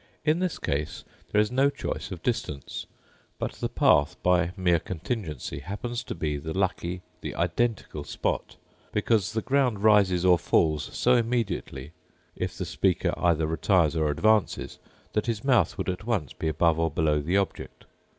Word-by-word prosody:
In 155 +2 +3
this 185 -1 -1
case 75 +2 -3 0.3
there 105 - +3
is 105 +1 +2
no 135 +2 +4
choice - - -4
of - - -7
distance; 70 -3 -3 0.5
but - - -2
the - - -4
path, 75 +4 +3
by 90 -1 +3
mere 90 -3 +3
contingency, 80 - -4
happens 120 - -4
to - - -5
be 75 -3 -2
the 80 +5 -5
lucky, 90 -1 -1 0.2
the - - -5
identical 90 -3 -1
spot, 70 - -3 0.4
because 105 -1 +1
the 110 - -1
ground 130 -7 +1
rises 100 -4 +4
or 90 -2 +6
falls 80 -3 +1
so 125 - +2
immediately, 110 - -1 0.4
if - - -4
the - - -3
speaker - - +1
either 80 -2 +2
retires 80 0 +2
or 80 -2 +1
advances, 110 +8 +1 0.3
that 105 +2 0
his 110 -2 -2
mouth 125 - +3
would - - -3
at 90 +2 -3
once 95 - -1
be 80 - -4
above 80 +1 +2
or 80 0 +2
below 75 -1 +1
the 85 +7 +1
object. 100 -1 -3
90 Hz, 165 wpm, -27 LUFS, 80-110 Hz, 0.5 s, or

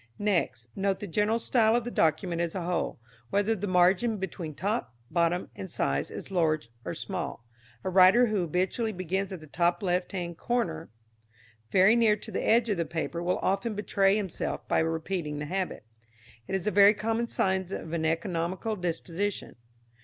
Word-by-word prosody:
Next, 170 - 0
note 195 -1 0
the - - -5
general 210 +4 +1
style 230 -1 +3
of 240 - +1
the 240 - -5
document 165 +1 +1
as 170 +1 -2
a 185 - -2
whole, 175 -7 -2 0.3
whether 205 +3 +2
the 205 0 -4
margin 185 +5 +3
between 175 -5 -5
top, 200 - -2 0.2
bottom, 170 +1 +1
and 190 - -7
sides 70 - -1
is - - -8
large 155 -8 +1
or - - -4
small. 175 - -5 0.4
A - - -1
writer 190 +6 +7
who 215 -4 0
habitually 185 +7 -1
begins 185 +2 -2
at 185 -4 -6
the - - -10
top 175 +4 0
left 180 -1 0
hand 175 -3 -5
corner 170 -10 -1 0.8
very 195 +4 +5
near 225 -3 +4
to 210 - -10
the - - -2
edge 235 +1 +4
of 205 -4 0
the 170 - +1
paper 165 +1 -3
will 180 +1 0
often 195 +3 0
betray 200 -1 +2
himself 195 -5 -3
by - - +2
repeating 160 -1 -2
the 150 - -4
habit. 185 - -3 0.6
It - - -2
is 190 - -2
a 210 - +1
very 205 +1 +7
common 225 +2 -1
sign 190 -3 0
of 165 -4 -5
an 165 -1 -1
economical 170 +5 -1
disposition. 180 +2 -3
185 Hz, 180 wpm, -28 LUFS, 170-205 Hz, 0.8 s, writer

